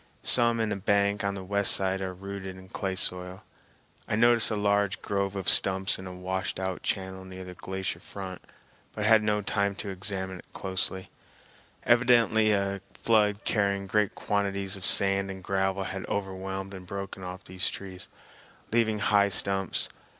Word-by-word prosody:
Some 115 -1 +5
in 110 -1 0
a - - -1
bank 100 +1 +1
of 100 0 -1
the 95 - -6
west 100 +1 +4
side 95 0 +1
are 95 -1 -2
rooted 95 0 -7
in 95 0 -13
clay 95 -1 -3
soil. 90 0 -1 0.6
I - - 0
noticed 120 0 +4
a 110 - -1
large 100 -1 +1
grove 100 -1 -1
of 95 -2 -4
stumps 95 0 +3
in 95 - -7
a - - -6
washed 90 +1 -3
out 95 -1 -3
channel 95 -1 -3
near 95 0 -9
the 90 0 -9
glacier 95 +1 -4
front 95 -2 -8 0.5
but 105 - -2
had 110 0 +6
no 105 -1 0
time 100 0 0
to 100 - -5
examine 95 -1 -3
closely. 95 0 -3 0.7
Evidently 120 -3 +4
a 100 -1 0
flood 105 -2 +2
carrying 100 -2 +1
great 105 +1 +1
quantities 100 -1 -1
of 95 -3 0
sand 100 0 +3
and 95 -1 -7
gravel 95 +1 0
had 95 0 -5
overwhelmed 95 0 -4
and 90 -1 -9
broken 100 0 -6
off 90 +1 -7
these 95 +1 +1
trees, 95 -2 -8 0.6
leaving 110 -1 +2
high 100 -1 +3
stumps. 95 0 +1
100 Hz, 165 wpm, -28 LUFS, 95-100 Hz, 0.7 s, had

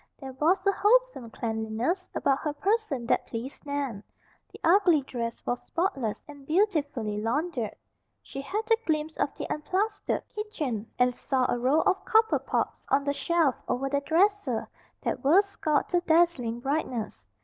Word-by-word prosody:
There 265 -2 -7
was 350 +8 +2
a 395 - +5
wholesome 445 - +2
cleanliness 225 - -2
about 275 0 +2
her 300 -2 -2
person 375 - 0
that - - +1
pleased 240 +4 -6
Nan. 275 -8 -3 0.5
The - - -12
ugly 345 -3 +5
dress 235 -3 -5
was 245 - -1
spotless 300 - -1
and 290 -2 -12
beautifully 285 - 0
laundered. 250 0 -1 0.5
She 275 - -7
had 405 +11 -2
a 455 0 +3
glimpse 315 0 0
of - - 0
the - - -5
unplastered 400 +7 -1
kitchen 300 - -4
and 250 0 +3
saw 255 +1 0
a 245 - 0
row 265 +6 +3
of 385 0 +1
copper 445 0 +3
pots - - -2
on 275 +1 +3
the 285 0 0
shelf 330 -3 +2
over 270 +2 -1
the 280 0 0
dresser 325 - +1 0.4
that - - -2
were 335 +9 +6
scoured 310 -7 -1
to 355 - +3
dazzling 320 -9 +2
brightness. 240 - -3
290 Hz, 160 wpm, -28 LUFS, 245-365 Hz, 0.5 s, were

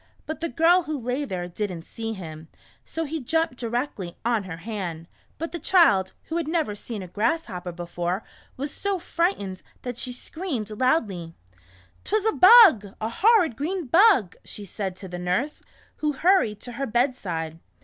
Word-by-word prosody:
But 315 - -5
the 335 - -1
girl 335 +7 +4
who 310 -3 -4
lay 250 +4 -2
there, 180 -7 -4
did 200 +3 -3
n't 165 -2 -8
see 225 0 -5
him, 160 -5 -8 0.4
so 325 0 -4
he 315 +2 -3
jumped 320 0 0
directly 235 -7 -3
on 230 -4 +1
her 170 -3 -6
hand. 170 -4 -5 0.3
But 330 +2 -4
the 340 - -5
child, 260 - +4
who 325 - -3
had 335 -3 -2
never 315 -9 0
seen 210 0 -6
a - - -8
grasshopper 195 - -2
before, 175 +2 -3 0.3
was 280 +2 -4
so 400 -1 -1
frightened 335 - -1 0.2
that 245 -1 -5
she 255 - -4
screamed 250 - -5
loudly. 210 - 0 0.3
" 90 0 -29
'T 420 - -1
was 430 -1 +1
a 440 - +4
bug, 365 - +8
a 220 - -2
horrid 375 - +4
green 335 +6 -2
bug," 330 - +5
she 205 - -8
said 190 -1 -4
to 190 - -9
the 180 -1 -6
nurse, 185 +12 -1 0.4
who 300 -1 0
hurried 305 - +3
to 245 - -8
her 270 +3 -3
bedside. 190 - -1
235 Hz, 180 wpm, -25 LUFS, -, 0.4 s, bug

